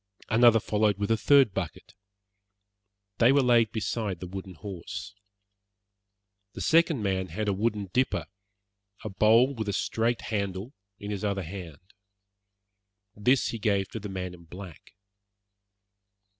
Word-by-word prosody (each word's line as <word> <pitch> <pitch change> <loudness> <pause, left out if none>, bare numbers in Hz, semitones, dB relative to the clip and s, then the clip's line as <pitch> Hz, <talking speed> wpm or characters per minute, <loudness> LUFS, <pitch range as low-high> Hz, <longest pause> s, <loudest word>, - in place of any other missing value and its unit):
Another 115 0 +6
followed 105 -2 +1
with 100 +2 -1
a - - +5
third 130 -1 +4
bucket. - - -5 1.3
They 120 +2 +6
were 140 0 +4
laid 120 -3 +4
beside 110 -3 -3
the - - -6
wooden 95 0 -8
horse. 95 +2 -7 1.4
The - - -7
second 160 -7 +3
man 95 -1 -1
had 105 +6 -4
a 100 - +2
wooden 105 -2 -2
dipper 125 -10 +1 0.8
a 110 - -4
bowl 115 +7 +4
with 110 -5 -4
a - - -1
straight 115 +4 0
handle 100 +3 -3 0.2
in 105 0 -6
his 100 -1 -4
other 100 -2 -1
hand. 85 -4 -8 1.3
This 125 +6 +2
he 115 - -4
gave 100 -2 0
to 110 - -6
the 105 0 -7
man 90 -1 -5
in 85 -1 -14
black. 90 -1 -12
105 Hz, 140 wpm, -27 LUFS, 95-115 Hz, 1.4 s, Another